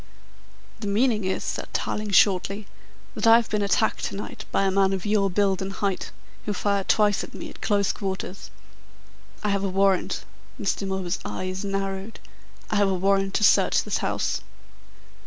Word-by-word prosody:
"The 215 - -4
meaning 215 0 +2
is," 190 - -1
said - - -4
Tarling 210 0 -2
shortly, 195 +1 +3 0.5
"that - - 0
I 225 - +9
have 235 -1 +2
been 210 -1 +1
attacked 200 -3 +1
to - - -4
night 200 - -7
by - - +2
a 195 - +2
man 195 0 +3
of 190 0 -3
your 205 -1 +2
build 195 0 +1
and 190 +1 -3
height, 195 -1 -2 0.4
who 210 - 0
fired 200 0 -1
twice 210 -2 +3
at - - -10
me - - -7
at - - -15
close 200 -2 +2
quarters. 190 -1 -5 0.9
I 210 - +1
have 200 -1 0
a 195 - 0
warrant 195 0 +1 0.2
" - - -27
Mr. 200 -1 -1
Milburgh's 190 -2 -2
eyes 185 - -4
narrowed 195 +1 -3 0.5
"I 210 - +2
have 200 -1 +4
a 190 - +1
warrant 195 +1 +1
to 210 - +1
search - - +4
this - - -1
house." - - -1
195 Hz, 180 wpm, -25 LUFS, 190-205 Hz, 0.9 s, I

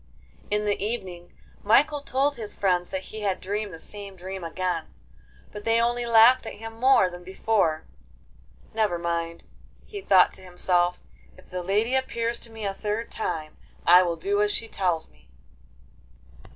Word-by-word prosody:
In 210 0 0
the 205 -1 0
evening 185 -6 -5 0.3
Michael 285 +7 +3
told 280 +1 0
his 215 -4 -3
friends 180 -3 +1
that 190 0 -5
he 220 - -5
had 195 -3 -1
dreamed 205 +2 -3
the 165 - -8
same 200 +2 -9
dream 190 0 -7
again, 170 -1 -2 0.7
but 210 - -8
they 230 +1 +3
only 240 +1 0
laughed 235 +2 +6
at - - -6
him 225 +1 -8
more 260 -6 +5
than 175 0 -9
before. 190 -4 0 0.9
'Never 215 -5 +1
mind,' 170 0 -3 0.4
he 405 -2 -7
thought 190 - +5
to - - -10
himself; 180 -1 +1 0.4
'if - - -19
the 180 0 -3
lady 210 +7 0
appears 235 -3 0
to 230 - -10
me 220 -2 -7
a 195 - -1
third 210 +3 -3
time, 155 -7 -4 0.3
I 180 +1 +8
will 175 -2 0
do 200 +5 0
as 210 0 +2
she 225 - -2
tells 180 -6 -1
me. - - -26
200 Hz, 165 wpm, -26 LUFS, 180-225 Hz, 0.9 s, I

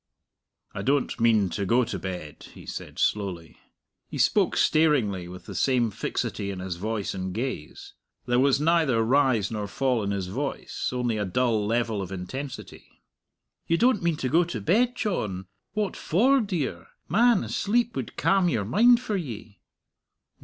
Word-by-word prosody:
"I - - -4
don't 140 +1 0
mean 110 -4 +3
to 100 - -2
go 120 +6 +3
to - - -4
bed," 90 -6 -7
he - - -12
said - - -7
slowly. 90 -6 -2 0.5
He - - -7
spoke - - +2
staringly, 125 - +2
with 90 +1 -10
the - - -8
same 125 -4 +1
fixity 100 0 -3
in 100 - -5
his 90 -1 -5
voice 105 +1 -3
and 95 0 -4
gaze. 115 - -5 0.3
There 125 0 +2
was 135 +1 +3
neither 155 -7 +3
rise 125 -4 +2
nor 105 -2 -3
fall 125 +2 0
in 100 - -2
his 100 -2 -2
voice, 130 +10 -3
only 125 -3 -1
a 105 - 0
dull 110 +1 +1
level 115 -2 0
of 95 -1 -6
intensity. 130 +9 -8 0.6
"You 165 - +2
don't 245 -1 +3
mean 170 -2 +1
to 130 - -2
go 170 +5 +4
to 165 -9 -5
bed, 235 - +2
John! 105 - -2 0.3
What 210 -3 -1
for, 255 - +3
dear? 145 - -3 0.2
Man, 230 +4 +4
a - - -7
sleep 235 +3 0
would - - -5
calm 190 -2 +3
your 110 -10 -1
mind 235 - +5
for 215 -5 -2
ye." 110 - -7
120 Hz, 165 wpm, -26 LUFS, 100-165 Hz, 0.6 s, mind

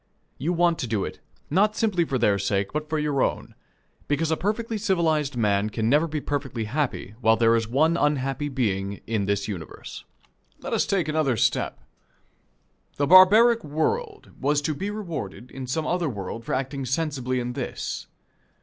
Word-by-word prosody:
You 150 +7 0
want 170 -1 +2
to 125 - -2
do 105 -3 -1
it, - - -7 0.3
not 210 +6 +3
simply 205 -7 +1
for 135 - -1
their 105 -4 +2
sake, 100 0 -1
but 150 0 -3
for 155 - 0
your 150 -3 0
own; - - -1 0.5
because 155 +2 0
a - - +3
perfectly 215 +5 -2
civilized 160 - +1
man 105 -2 +2
can 110 +1 -1
never 150 +4 +4
be 155 -1 -3
perfectly 135 -5 -3
happy 125 -3 -2
while 110 -1 +5
there 115 +1 +4
is 115 -1 0
one 155 +8 +2
unhappy 145 -2 0
being 100 -7 -2
in 110 -3 -1
this 100 0 -1
universe. 90 -7 -7 0.6
Let - - -5
us - - +1
take 185 -6 +1
another 155 -6 +1
step. - - 0 1.2
The 145 - +2
barbaric 215 +8 +7
world 410 - -2
was 145 +2 +2
to 155 - 0
be 195 +8 -4
rewarded 165 - -6
in 130 -1 -7
some 155 +5 -1
other 175 -2 0
world 110 +1 -6
for - - -1
acting 135 +1 -3
sensibly 130 -2 -1
in 125 0 -3
this. - - -4
145 Hz, 175 wpm, -25 LUFS, 115-165 Hz, 1.2 s, barbaric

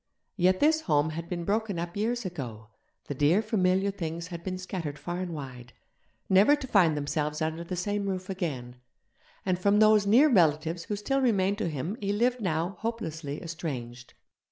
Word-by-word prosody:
Yet 185 -1 +3
this 310 +2 +4
home 155 - +1
had 165 +2 -6
been 175 -2 -3
broken 210 -1 0
up 170 +1 -4
years 230 +2 -1
ago, 120 - -6 0.4
the - - -4
dear 145 +7 +3
familiar 195 -2 +1
things 170 -2 -5
had 170 -1 -7
been 185 -1 -3
scattered 175 -5 -5
far 175 +2 -4
and 185 -1 -3
wide, 125 -5 -8 0.5
never 200 +10 +6
to 290 - -7
find 180 - +3
themselves 150 +1 -2
under 160 +1 -2
the 180 +2 -4
same 205 +3 -2
roof 185 -1 -3
again; 140 -11 -4 0.7
and 185 -2 +1
from 200 +2 +3
those 215 -1 +5
near 250 +9 +6
relatives 165 - +2
who 210 - -2
still 270 +7 0
remained 200 -5 +2
to 175 - 0
him 160 - -4
he 200 0 0
lived 240 +3 +1
now 175 0 -1
hopelessly 160 -10 -4
estranged. 130 -7 -6
180 Hz, 180 wpm, -28 LUFS, 155-205 Hz, 0.7 s, never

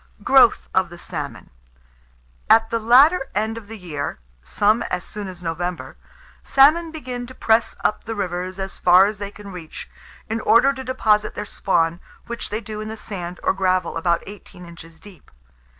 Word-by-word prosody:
GROWTH 265 -2 +5
OF 190 -2 +2
THE 175 - -11
SALMON. - - -6 1.0
At 225 0 +5
the 230 - 0
latter 265 +7 +5
end 220 +2 -1
of 225 -3 -10
the 225 +1 -9
year 150 - -5 0.2
some 210 - +1
as 180 -1 -2
soon 205 -1 -7
as 180 -1 -10
November 175 +1 -4 0.5
salmon 310 +5 +4
begin 255 -6 -6
to 260 - -12
press 225 0 +2
up 210 - 0
the 225 - -4
rivers 185 -1 -4
as 195 0 -6
far 180 +2 +6
as 205 -1 -3
they 200 -1 -4
can 205 -1 -12
reach, 170 -4 -9 0.4
in 225 +1 -2
order 250 +6 +4
to 265 -1 -7
deposit 215 -5 +1
their 210 - -4
spawn, 170 -4 0 0.3
which 235 0 -6
they 215 +2 -3
do 215 -2 -7
in 215 - -6
the 220 +1 -6
sand 180 -5 -6
or - - +2
gravel, 185 -2 0
about 170 +1 0
eighteen 195 -3 -12
inches 165 -1 -13
deep. 190 -6 -16
205 Hz, 180 wpm, -21 LUFS, 180-230 Hz, 1.0 s, far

